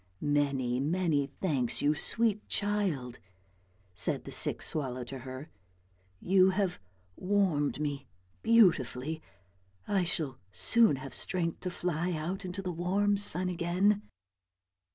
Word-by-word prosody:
" 90 +1 -39 0.2
Many, 130 -4 -1
many 155 -1 0
thanks, 135 -6 -1
you 145 +1 +3
sweet 215 +6 +2
child," 190 - -1 0.7
said 90 - 0
the - - -9
sick - - +3
swallow 130 -4 -2
to 130 +2 -8
her; 130 +3 -9 0.4
" 90 0 -37
you 190 -1 +6
have 190 - -1 0.4
warmed 180 -8 0
me 140 -3 -3 0.3
beautifully. 160 - +3 0.7
I 195 -3 +1
shall 160 -6 -2
soon 220 - +3
have 135 +1 -8
strength 170 -3 -2
to 180 - -4
fly 175 0 -2
out 175 +5 -4
into 185 +2 -5
the 180 - -3
warm 190 +4 +1
sun 185 -2 +3
again." 180 +4 +1
165 Hz, 130 wpm, -30 LUFS, 135-190 Hz, 0.7 s, you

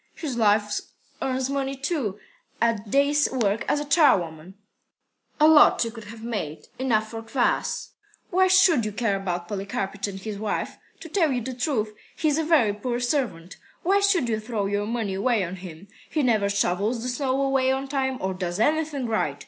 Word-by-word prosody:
"His 290 -6 -4
wife 210 -2 +2 0.4
earns 260 -1 -1
money, 275 0 -2
too, 270 - -2 0.4
at 225 -3 0
day's 285 +4 +3
work 225 -4 0
as 295 0 +1
charwoman." 190 - +2 0.8
"A 305 - +7
lot 315 -1 +7
she 230 - 0
could 225 -2 -10
have 220 +2 -10
made! 160 -10 -4
Enough 220 -5 +1
for 225 -1 -5
kvas." 235 +3 -1 0.4
"Why 375 +1 +4
should 365 -8 +5
you 215 -1 -3
care 220 -2 0
about 180 -3 -3
Polikarpych 195 0 -3
and 195 -1 -6
his 205 0 -6
wife? 215 -1 -3 0.2
To - - -8
tell 325 -2 +1
you 250 -2 -1
the 255 +3 -5
truth, 245 -5 -1 0.2
he's 310 -1 +1
a - - +1
very 300 -10 +3
poor 240 +3 -3
servant. 240 - -2 0.3
Why 390 +3 +3
should 395 -9 +2
you 220 -2 0
throw 215 -2 -3
your 205 +1 -1
money 225 -4 -2
away 205 +2 +1
on 180 +1 -5
him? 180 0 -10 0.2
He 305 - 0
never 215 -5 +2
shovels 200 +4 0
the - - -3
snow 260 +1 -1
away 270 -1 +2
on 265 +1 -2
time, 265 -2 -1
or 190 0 -1
does 180 0 -4
anything 300 +1 +1
right. 215 -11 -1
230 Hz, 180 wpm, -25 LUFS, 200-275 Hz, 0.8 s, A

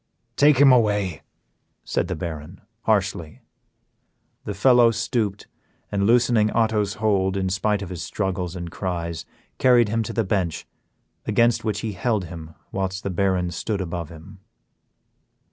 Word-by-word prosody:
"Take 145 -1 +5
him 140 0 +7
away," 105 - +2 0.6
said - - -1
the - - -3
Baron, 80 +2 -7 0.2
harshly. 95 -7 -1 1.0
The 100 - -4
fellow 120 +3 +5
stooped, 110 -3 -2 0.5
and 100 -1 +1
loosening 120 -2 +4
Otto's 110 -3 +1
hold, 100 -3 +1
in 95 -1 -1
spite 100 +2 0
of 95 - -7
his 90 -2 -6
struggles 95 -3 -3
and 85 -2 -6
cries, 85 -3 -4 0.3
carried 120 -4 +5
him 115 +2 0
to 110 - -4
the 115 - +1
bench, 95 -5 -1 0.6
against 115 +2 +2
which 105 -2 -2
he 110 - -3
held 105 0 -1
him, 80 -2 -10 0.2
whilst 95 0 -3
the 100 - -2
Baron 90 -1 0
stood 100 +5 -3
above 85 -3 -4
him. 80 -1 -13
100 Hz, 145 wpm, -23 LUFS, 90-110 Hz, 1.0 s, him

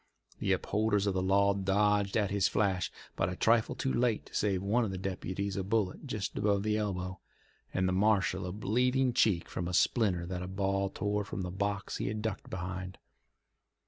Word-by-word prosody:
The - - 0
upholders 105 -1 +1
of 100 - +1
the 95 - 0
law 100 +2 +3
dodged 100 +1 +2
at 105 -3 +1
his 100 -1 +3
flash, 95 -3 0 0.2
but 85 - 0
a 90 - -4
trifle 115 +3 +3
too 130 - -1
late 120 -2 +1
to - - -17
save 100 -3 0
one 110 +5 +2
of 110 - -1
the 95 - -4
deputies 95 +1 -3
a 95 - -1
bullet 105 +5 -1
just 105 -6 -3
above 100 -1 +1
the 105 0 +1
elbow, 95 -3 -2 0.5
and 95 0 +1
the 95 - +1
marshal 95 -2 +2
a - - -3
bleeding 125 +5 +1
cheek 100 -8 +2
from 85 - -4
a 90 - -1
splinter 95 -7 +2
that 90 0 -4
a 90 - -4
ball 100 +1 0
tore 105 +2 -1
from 100 - -5
the 90 - -4
box 100 +1 -2
he - - -2
had 105 +1 -3
ducked 110 -3 -3
behind. 90 +1 -5
100 Hz, 200 wpm, -31 LUFS, 95-105 Hz, 0.5 s, law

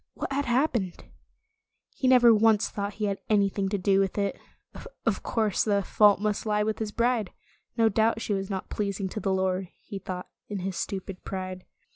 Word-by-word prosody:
What - - -4
had 285 +1 0
hap 255 +5 +2
pened 190 -7 -3 0.9
He 260 - -1
never 245 -2 +7
once 220 -1 +4
thought 200 0 -4
he 215 - -2
had 200 -1 -1
anything 200 -2 +2
to 205 - 0
do 195 +1 +2
with 195 0 0
it. 200 -1 0 0.7
Of - - +1
course, 215 -3 0
the 200 -2 +1
fault 205 +1 +4
must 210 0 -1
lie 210 0 +2
with 215 0 -2
his 215 -2 -3
bride. 235 -3 +1 0.5
No 225 -1 +5
doubt 220 +1 +2
she 220 - -2
was 195 0 -2
not 190 -2 -4
pleasing 200 -2 -2
to 215 - -5
the 195 - -1
Lord, 190 0 0
he 200 - -8
thought 180 -1 -6 0.2
in 205 -3 -4
his 190 0 -3
stupid 190 0 -5
pride. 185 -1 -5
205 Hz, 195 wpm, -27 LUFS, 195-220 Hz, 0.9 s, never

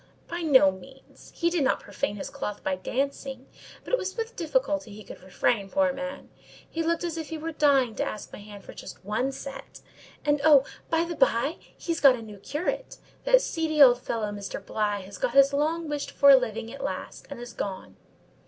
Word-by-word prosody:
"By 340 +1 -4
no 260 - +6
means. 265 +8 -15
He 340 0 +1
did 340 -4 +1
not 265 - +2
profane 280 -7 -3
his 200 - -6
cloth 210 -1 -5
by 190 - 0
dancing; 270 +4 -3 0.4
but - - -8
it - - +4
was 380 +3 -4
with 455 +1 -4
difficulty 300 - -1
he 210 +1 -10
could - - -11
refrain, 195 +2 0
poor 285 +1 +2
man: 275 0 -7 0.4
he 330 - -3
looked 335 +1 0
as 335 -1 -3
if 320 -2 -5
he 320 - -4
were 325 +1 -4
dying 275 -6 +3
to - - +1
ask 210 - -6
my - - -8
hand 205 -1 -12
just - - -8
for 190 - -22
one 245 +6 0
set; 275 0 -9 0.4
and—oh! 290 -1 +5 0.2
by 330 0 +2
the 340 0 -4
by—he's 345 -8 0
got 275 -3 +8
a 235 - -8
new 210 -2 -10
curate: 360 - -3 0.3
that - - +5
seedy 320 -2 -1
old 250 -3 +8
fellow 220 -4 -2
Mr. 205 -1 -5
Bligh 205 -2 -1
has 190 - -10
got - - -1
his 275 0 +6
long 315 +3 0
wished 295 -1 -3
for 280 0 +7
living 230 -3 -1
at 275 0 -8
last, 280 - -5
and 280 - -7
is 240 0 -8
gone." 190 -2 -5
275 Hz, 200 wpm, -27 LUFS, 220-320 Hz, 0.4 s, got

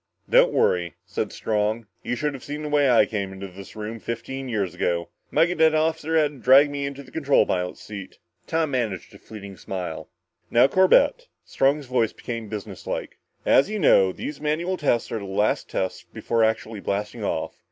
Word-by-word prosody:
"Don't - - +5
worry," 85 - +1
said - - -3
Strong. 110 +1 -1 0.2
"You 120 - -2
should 150 +4 -1
have 135 - -9
seen 150 +1 -5
the 150 - -4
way 145 -2 +3
I 120 - +6
came 100 -3 -3
into 95 0 -7
this 95 +1 -12
room 110 +1 -5
fifteen 130 +4 -5
years 100 -6 -1
ago. 85 -1 -1 0.2
My - - +4
cadet 160 -2 +3
officer 160 0 +1
had 145 -5 0
to 130 - +2
help 140 +2 +8
me 140 -1 -2
into 140 0 -7
the 130 - -17
control 145 -3 +3
pilot's 90 -1 -2
seat." 100 -3 -9 0.3
Tom 160 -2 0
managed 115 -8 -2
a - - -14
fleeting 100 -3 -10
smile. 85 -4 -5 0.4
"Now, 120 - +5
Corbett" 190 - +4 0.2
Strong's 140 +2 +1
voice 125 -3 0
became 115 -3 -6
businesslike 105 -2 -6 0.3
"as 135 - +5
you 215 - -2
know, 95 - +5
these 145 +9 -7
manual 160 +5 0
tests 130 -8 0
are 115 - -2
the 100 - -7
last 100 +2 0
tests 95 - -3
before 115 -1 0
actually 110 -1 -1
blasting 105 +3 -3
off. 80 -5 -3
120 Hz, 185 wpm, -24 LUFS, 100-150 Hz, 0.4 s, help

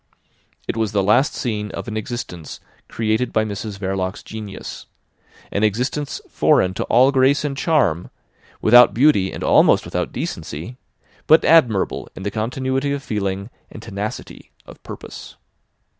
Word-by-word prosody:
It - - -2
was 110 -2 -1
the 100 -2 +2
last 120 +9 +3
scene 105 -4 -3
of - - -6
an 110 - -5
existence 110 -7 -6 0.3
created 115 +2 -1
by 110 0 +1
Mrs 105 0 -5
Verloc's 95 0 -3
genius; 105 -3 -8 0.6
an 100 - -1
existence 125 +7 -1
foreign 90 - +2
to - - -3
all 130 +4 +4
grace 135 +2 +3
and 140 -2 -2
charm, 125 - +1 0.5
without 120 +2 +7
beauty 120 -8 +3
and - - -6
almost - - +4
without - - -3
decency, 80 +12 -6 0.5
but 160 - +6
admirable 125 - +3
in 95 - -8
the 100 - -2
continuity 130 +6 -2
of 140 -1 -4
feeling 100 -1 -3 0.2
and 110 - -11
tenacity 105 -1 -6 0.2
of - - -14
purpose. - - -10
110 Hz, 145 wpm, -20 LUFS, 100-130 Hz, 0.6 s, without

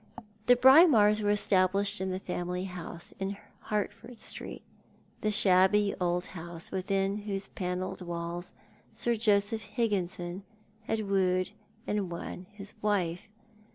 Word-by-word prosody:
The 245 - +8
Braemars 245 - +7
were 205 - +1
established 200 -1 +2
in 190 - -1
the 185 - -2
family 180 -1 -3
house 180 -2 -7
in 195 +1 -3 0.3
Hert 210 -1 -1
ford 235 +2 -13
Street, - - -6 0.6
the 215 - +1
shabby 200 0 +4
old 175 0 0
house 170 -1 -5
within 195 +1 0
whose 205 -2 -4
panelled 180 0 -4
walls 170 0 -5 0.4
Sir 240 0 0
Joseph 215 0 +2
Higginson 195 -4 -2 0.4
had 220 0 -1
wooed 185 -2 +1 0.3
and 205 -3 -1
won 175 +1 -7
his 205 -1 -8
wife. 190 -3 -1
195 Hz, 125 wpm, -30 LUFS, 180-210 Hz, 0.6 s, The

